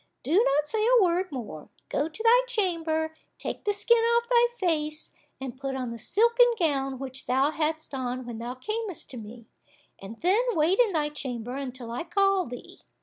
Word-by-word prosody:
Do 290 - -1
not 300 -7 +3
say 430 +5 0
a 475 -1 +5
word 360 +1 +1
more, 220 - -7 0.2
go 295 +3 0
to 430 +8 -7
thy 470 +2 +6
chamber, 330 -8 -1 0.2
take - - -5
the 415 - +3
skin 470 +3 +3
off 470 +1 +2
thy 480 -1 +5
face, 310 -4 -1 0.3
and 265 -2 -6
put 270 0 -4
on 255 -2 -3
the 235 - -7
silken 470 - +4
gown 275 -6 0
which 265 0 -6
thou 265 +4 +2
hadst 315 -1 -2
on 255 -1 -3
when 235 -2 -6
thou 240 +2 -5
camest 430 - -4
to 255 - -7
me, 230 +1 -10 0.5
and 205 +4 -10
then 380 +6 +4
wait 335 +5 +2
in 455 -6 +4
thy 300 -2 +1
chamber 250 -5 -5
until 255 -3 -5
I 240 - -3
call 390 +1 +2
thee." 245 0 -10
310 Hz, 190 wpm, -27 LUFS, 255-395 Hz, 0.5 s, thy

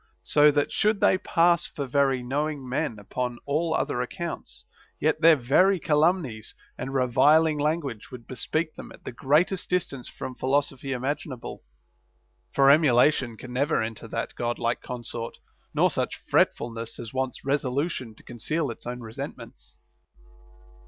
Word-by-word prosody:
So 150 0 +5
that, 145 -1 +1
should 215 -1 +2
they 185 - +4
pass 170 -2 +3
for 140 - -5
very 135 -1 +1
knowing 145 +1 -2
men 130 -2 -2
upon 120 +4 -4
all 160 +3 0
other 120 - -1
accounts, 170 +7 -6 0.3
yet 155 0 +1
their 165 0 +8
very 170 +9 +3
calumnies 150 - +1 0.2
and 130 +2 -5
reviling 145 +5 +4
lan 155 +3 +1
guage 120 -8 -7
would 125 -2 -9
bespeak 155 +6 -2
them - - -10
at - - -15
the - - -6
greatest 155 +9 +1
distance 155 -8 -2
from 130 - -7
philosophy 135 +1 -1
imaginable. 135 0 -4 0.9
For 135 0 +6
emulation 130 -4 +4
can 125 +2 -9
never 140 +5 +1
enter 110 -1 -6
that - - -4
God 120 0 -2
like 120 0 -1
consort, 120 -2 -6 0.3
nor - - +3
such - - -2
fretfulness 115 -1 0
as 115 0 -8
wants 130 -1 -3
resolu 140 +3 0
tion 120 -8 -7
to - - -19
conceal 140 +5 -2
its 115 - -10
own 125 0 -5
resentments. 115 +5 -8
135 Hz, 150 wpm, -26 LUFS, 125-155 Hz, 0.9 s, their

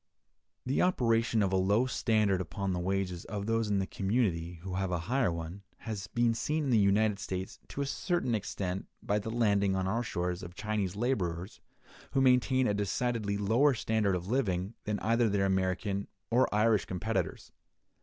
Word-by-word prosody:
The 130 +2 +1
operation 115 - +2
of 95 -1 0
a - - +4
low 100 +6 +3
standard 110 -6 +1
upon 95 +2 -3
the 90 - -1
wages 90 -1 -1
of 100 -2 -4
those 115 -1 0
in 100 - +2
the 95 - +1
community 95 -5 -1
who 95 -1 -5
have 95 0 -1
a 90 - 0
higher 125 -5 +1
one, 85 +3 -6 0.2
has 105 -4 -5
been 120 +3 +2
seen 150 +7 -1
in 140 - -1
the 115 - +5
United 100 +1 +3
States 95 -2 -5
to 140 - -5
a - - 0
certain 140 -2 -1
extent 95 -3 -3 0.2
by 105 +1 +1
the 105 - -5
landing 100 -4 +2
on 95 -1 0
our 115 +5 0
shores 90 -5 -2
of 90 0 -9
Chinese 105 -3 -2
laborers, 95 -6 -2 0.5
who 135 - +3
maintain 130 0 +4
a 105 - +2
decidedly 105 +1 -1
lower 120 +8 +3
standard 110 -4 +1
of 90 0 -4
living 100 -5 0
than 105 0 -1
either 115 +1 +2
their 100 -1 +1
American 95 +1 0 0.2
or 125 +3 +3
Irish 105 0 +3
competitors. 100 +5 -3
105 Hz, 180 wpm, -31 LUFS, 95-115 Hz, 0.5 s, the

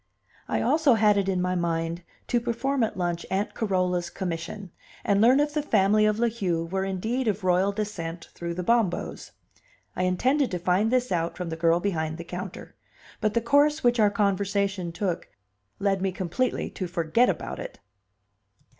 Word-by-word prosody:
I - - 0
also 305 -6 +4
had 210 -1 +4
it 195 -1 +1
in 185 -1 0
my 180 0 0
mind 170 -1 -1 0.2
to 240 - +1
perform 255 +3 -1
at 225 -4 0
lunch 175 -2 -1
Aunt 195 +2 -1
Carola's 185 -4 0
commission, 180 +1 -5 0.3
and 200 0 +3
learn 250 +5 +6
if 295 0 +1
the 300 - 0
family 215 -5 +3
of 210 0 +1
La 235 +1 +2
Heu 180 -8 -1
were 190 +3 -2
indeed 220 +7 -2
of 205 -1 -1
royal 185 +2 +3
descent 180 -5 -5
through 170 0 -5
the 180 - -3
Bombos. 230 -2 0 0.7
I 185 - 0
intended 260 +10 +2
to 180 - -2
find 180 +5 +1
this 250 -1 +1
out 170 -1 -1
from 180 -2 -4
the 160 - -3
girl 165 +1 +3
behind 160 -5 -2
the 170 - -6
counter, 180 +2 -7 0.4
but 215 -1 0
the 235 - +3
course 290 +5 +3
which 240 -1 +3
our 210 -1 +5
conversation 200 -2 0
took 180 0 -3 0.5
led 195 -1 0
me 190 0 0
completely 190 +7 -2
to 185 - -4
forget 175 +7 +2
about 175 - -3
it. - - -8
195 Hz, 180 wpm, -26 LUFS, 175-225 Hz, 0.7 s, learn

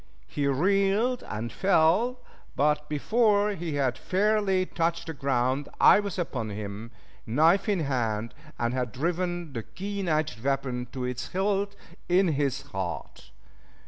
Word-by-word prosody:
He 140 - -2
reeled 195 - +2
and 110 +2 -4
fell, 195 - +2 0.3
but 150 +1 +1
before 210 - +2
he 170 -6 -4
had 135 -3 0
fairly 195 -1 +2
touched 170 -1 -1
the 160 - -5
ground 135 0 0
I - - +7
was 200 -3 -4
upon 125 -11 -3
him, 105 +2 -6 0.4
knife 165 - +3
in 195 -5 +1
hand, 115 -6 -1 0.2
and 120 +1 -1
had 125 -3 -2
driven 175 +2 -2
the 115 - -3
keen 200 - -5
edged 155 -8 -1
weapon 130 -3 -1
to 130 - -4
its 125 0 -4
hilt 200 +1 -1 0.3
in 180 +1 +4
his 140 -3 0
heart. 95 -2 -6
155 Hz, 140 wpm, -27 LUFS, 125-195 Hz, 0.4 s, I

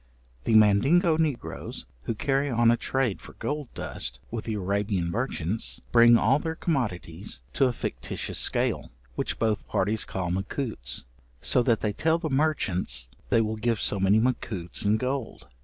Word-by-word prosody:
The 115 - +3
Mandingo 135 - +5
negroes, 155 -6 -3 0.2
who 115 - -2
carry 135 +4 0
on 115 -1 +4
a - - +4
trade 125 -3 -1
for - - -12
gold 145 -2 -4
dust - - -4
with 115 -1 -4
the 110 - -2
Arabian 100 -2 -1
merchants, 110 -3 -2
bring 120 0 +7
all 130 +6 +3
their 160 +1 -3
commodities 105 - -3
to 135 - +3
a - - +1
fictitious - - -3
scale, - - +1 0.2
which - - -2
both 110 -2 0
parties 105 +3 +1
call 90 -2 -3
macutes, 95 - -2 0.4
so 125 - +4
that 115 -2 +2
they 105 -1 0
tell 160 +8 +2
the 165 -3 -4
merchants 110 - 0 0.2
they 115 - +4
will 110 0 -2
give 115 0 0
so 100 - +1
many 95 +2 +4
macutes 110 -7 -1
in 105 +2 +3
gold. 130 +1 -3
110 Hz, 160 wpm, -27 LUFS, 100-135 Hz, 0.4 s, bring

